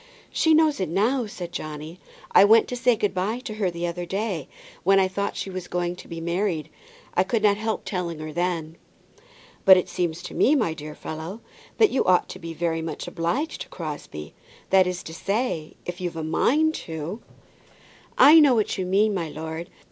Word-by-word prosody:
"She 320 Hz, -1 st, +3 dB
knows 310 Hz, -4 st, +3 dB
it 185 Hz, -, -1 dB
now," 225 Hz, +7 st, +1 dB
said 175 Hz, -4 st, -7 dB
Johnny; 155 Hz, +3 st, -7 dB, 0.3 s
"I -, -, +8 dB
went 220 Hz, +2 st, +6 dB
to 250 Hz, -, -3 dB
say 245 Hz, 0 st, +3 dB
good 205 Hz, -2 st, -1 dB
by 195 Hz, +5 st, -1 dB
to 245 Hz, -4 st, -6 dB
her 190 Hz, -, +2 dB
the 170 Hz, 0 st, -4 dB
other 175 Hz, +1 st, -3 dB
day, 195 Hz, -5 st, -2 dB, 0.3 s
when 195 Hz, +2 st, +4 dB
I 190 Hz, -, +3 dB
thought 200 Hz, +2 st, -3 dB
she 195 Hz, -, -4 dB
was 185 Hz, -1 st, -6 dB
going 175 Hz, 0 st, -2 dB
to -, -, -12 dB
be 165 Hz, -1 st, -6 dB
married. 170 Hz, -2 st, -2 dB, 0.4 s
I -, -, +3 dB
could 215 Hz, +3 st, -1 dB
not 205 Hz, -1 st, +4 dB
help 220 Hz, 0 st, -3 dB
telling 175 Hz, -4 st, -3 dB
her 155 Hz, 0 st, -7 dB
then." 170 Hz, -2 st, -2 dB, 0.9 s
"But 190 Hz, -1 st, +9 dB
it 185 Hz, -, 0 dB
seems 175 Hz, -1 st, -2 dB
to -, -, -7 dB
me, 295 Hz, -, +4 dB
my 220 Hz, -, +1 dB
dear 150 Hz, -1 st, -8 dB
fellow, 160 Hz, +8 st, -7 dB, 0.4 s
that 435 Hz, -3 st, +5 dB
you 270 Hz, -, +2 dB
ought 180 Hz, -1 st, +3 dB
to -, -, -8 dB
be 165 Hz, 0 st, -7 dB
very 165 Hz, 0 st, -1 dB
much 160 Hz, -, -5 dB
obliged 180 Hz, -, -2 dB
to -, -, -7 dB
Crosbie; 145 Hz, -, -7 dB, 0.4 s
that 190 Hz, -1 st, +5 dB
is 180 Hz, -1 st, -3 dB
to 160 Hz, -, -8 dB
say, 195 Hz, -3 st, -2 dB
if 175 Hz, +1 st, -6 dB
you've 175 Hz, -2 st, -3 dB
a 160 Hz, -, -3 dB
mind 305 Hz, -, +2 dB, 0.2 s
to 165 Hz, +7 st, -5 dB, 0.5 s
" -, -, -27 dB, 0.2 s
"I 325 Hz, -, +10 dB
know 285 Hz, -5 st, +6 dB
what 215 Hz, -3 st, 0 dB
you 185 Hz, -, -2 dB
mean, 205 Hz, +3 st, +3 dB
my 170 Hz, -5 st, -2 dB
lord. 160 Hz, +2 st, -6 dB
180 Hz, 205 wpm, -24 LUFS, 165-215 Hz, 0.9 s, I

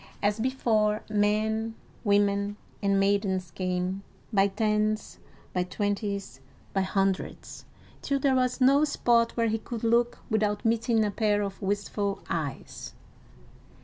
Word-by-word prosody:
As 205 Hz, +1 st, +1 dB
before, 220 Hz, -4 st, +1 dB
men, 220 Hz, +2 st, +1 dB, 0.3 s
women, 200 Hz, -1 st, +2 dB, 0.2 s
and 200 Hz, -1 st, +2 dB
maidens 195 Hz, -3 st, +1 dB
came, 185 Hz, +1 st, -2 dB, 0.3 s
by 195 Hz, -1 st, +5 dB
tens, 215 Hz, +1 st, 0 dB, 0.3 s
by 180 Hz, -, +1 dB
twenties, 200 Hz, -, -2 dB, 0.3 s
by 195 Hz, -, +2 dB
hundreds, 195 Hz, 0 st, -2 dB, 0.4 s
till 280 Hz, -, 0 dB
there 275 Hz, 0 st, +2 dB
was 255 Hz, 0 st, +1 dB
no 275 Hz, +3 st, +5 dB
spot 235 Hz, -6 st, +2 dB
where 230 Hz, -1 st, +2 dB
he 225 Hz, +1 st, 0 dB
could 230 Hz, +1 st, -6 dB
look 235 Hz, +1 st, +2 dB
without 210 Hz, -2 st, 0 dB
meeting 225 Hz, 0 st, +2 dB
a 205 Hz, -, -1 dB
pair 205 Hz, -1 st, +1 dB
of 195 Hz, -1 st, -5 dB
wistful 200 Hz, 0 st, -2 dB
eyes. 140 Hz, -, -4 dB
210 Hz, 125 wpm, -28 LUFS, 195-225 Hz, 0.4 s, by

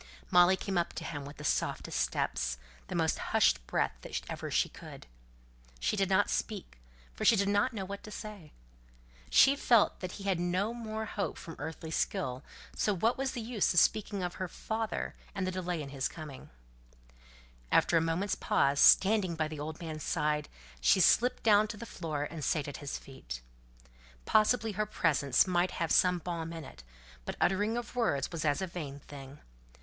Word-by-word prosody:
Molly 180 Hz, +1 st, +6 dB
came 190 Hz, -2 st, -1 dB
up 170 Hz, -, -2 dB
to -, -, -6 dB
him 145 Hz, -3 st, -5 dB
with 145 Hz, +1 st, -10 dB
the 150 Hz, -, -9 dB
softest 100 Hz, -, -1 dB
steps, -, -, -1 dB, 0.3 s
the -, -, -5 dB
most -, -, +1 dB
hushed -, -, +2 dB
breath -, -, +1 dB
that -, -, -4 dB
ever -, -, -5 dB
she -, -, +2 dB
could. -, -, -11 dB, 0.7 s
She -, -, 0 dB
did 195 Hz, -2 st, +1 dB
not 195 Hz, +1 st, +4 dB
speak, 200 Hz, -, -3 dB, 0.3 s
for -, -, -6 dB
she -, -, +6 dB
did 200 Hz, -1 st, +1 dB
not 205 Hz, +6 st, +2 dB
know 200 Hz, -5 st, -4 dB
what 200 Hz, +1 st, -6 dB
to -, -, -8 dB
say. 210 Hz, -7 st, -8 dB, 0.8 s
She 270 Hz, +1 st, +6 dB
felt 235 Hz, -6 st, +3 dB
that 185 Hz, -1 st, -5 dB
he 200 Hz, -, -8 dB
had 195 Hz, -3 st, 0 dB
no 180 Hz, +5 st, 0 dB
more 220 Hz, -2 st, -4 dB
hope 205 Hz, -1 st, -3 dB
from 165 Hz, -, -9 dB
earthly 160 Hz, +1 st, -6 dB
skill, 130 Hz, -4 st, -1 dB, 0.3 s
so 210 Hz, -, +1 dB
what 225 Hz, +7 st, +2 dB
was 270 Hz, 0 st, -2 dB
the 240 Hz, -, -4 dB
use 225 Hz, -2 st, 0 dB
of -, -, +8 dB
speaking 205 Hz, -2 st, +1 dB
of 175 Hz, 0 st, -2 dB
her 185 Hz, -, -1 dB
father 220 Hz, +5 st, -3 dB, 0.2 s
and 190 Hz, -, -1 dB
the 185 Hz, -, -1 dB
delay 180 Hz, -3 st, -3 dB
in 140 Hz, -, -8 dB
his 135 Hz, -1 st, -1 dB
coming? 150 Hz, -5 st, -10 dB, 1.2 s
After -, -, +4 dB
a 165 Hz, -, +5 dB
moment's 165 Hz, +5 st, 0 dB
pause, 140 Hz, 0 st, +1 dB
standing 195 Hz, -3 st, +6 dB
by 155 Hz, -1 st, 0 dB
the 155 Hz, -1 st, -7 dB
old 155 Hz, +2 st, -5 dB
man's 160 Hz, -3 st, -6 dB
side, 150 Hz, 0 st, -1 dB, 0.3 s
she -, -, +4 dB
slipped 245 Hz, +6 st, +4 dB
down 215 Hz, -1 st, +5 dB
to 210 Hz, -, -7 dB
the 235 Hz, -, -7 dB
floor, 155 Hz, -9 st, -4 dB
and 155 Hz, 0 st, -6 dB
sat 150 Hz, -1 st, 0 dB
at 145 Hz, -, -6 dB
his 145 Hz, -1 st, -5 dB
feet. 60 Hz, -, -9 dB, 0.8 s
Possibly 220 Hz, +1 st, +3 dB
her 210 Hz, +1 st, -2 dB
presence 140 Hz, -, +2 dB
might 180 Hz, -1 st, +1 dB
have 165 Hz, -2 st, -1 dB
some 180 Hz, -1 st, +4 dB
balm 165 Hz, -1 st, -4 dB
in 165 Hz, -1 st, -6 dB
it; -, -, -12 dB, 0.4 s
but -, -, -5 dB
uttering 205 Hz, +5 st, +1 dB
of 240 Hz, +1 st, -6 dB
words 145 Hz, -, 0 dB
was 165 Hz, -3 st, -4 dB
as 150 Hz, +4 st, +1 dB
a -, -, +1 dB
vain 150 Hz, -6 st, -7 dB
thing. 140 Hz, 0 st, -11 dB
175 Hz, 190 wpm, -31 LUFS, 150-210 Hz, 1.2 s, of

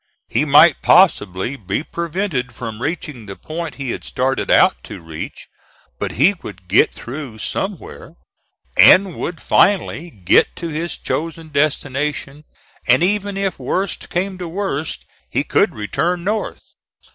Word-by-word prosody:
He 125 Hz, +7 st, +1 dB
might 150 Hz, +3 st, +6 dB
possibly 120 Hz, -, +3 dB
be 100 Hz, +3 st, -3 dB
prevented 165 Hz, -, -3 dB
from 115 Hz, -1 st, -6 dB
reaching 145 Hz, -6 st, -4 dB
the 100 Hz, -, -7 dB
point 160 Hz, -, -6 dB
he 135 Hz, -3 st, -4 dB
had -, -, -5 dB
started 135 Hz, +1 st, -1 dB
out 185 Hz, -, +4 dB
to 105 Hz, -, -8 dB
reach, 80 Hz, -2 st, -8 dB, 0.5 s
but -, -, -3 dB
he 160 Hz, -, +4 dB
would 95 Hz, -3 st, -10 dB
get 95 Hz, +5 st, +4 dB
through 130 Hz, -2 st, -8 dB
somewhere 190 Hz, -, -5 dB, 0.6 s
and 190 Hz, -1 st, +7 dB
would 170 Hz, -, -4 dB
finally 180 Hz, -3 st, +2 dB
get 95 Hz, -, +2 dB
to 170 Hz, -, -5 dB
his 165 Hz, +2 st, -4 dB
chosen 165 Hz, 0 st, -4 dB
destination: 145 Hz, 0 st, -1 dB, 0.4 s
and 125 Hz, +6 st, +5 dB
even 200 Hz, +1 st, 0 dB
if 195 Hz, -1 st, -2 dB
worst 190 Hz, 0 st, -2 dB
came 185 Hz, +1 st, -2 dB
to 180 Hz, -, -4 dB
worst 165 Hz, -4 st, -3 dB, 0.2 s
he -, -, 0 dB
could -, -, +1 dB
return 170 Hz, +12 st, -1 dB
North. 210 Hz, +3 st, -2 dB
155 Hz, 140 wpm, -19 LUFS, 125-180 Hz, 0.6 s, and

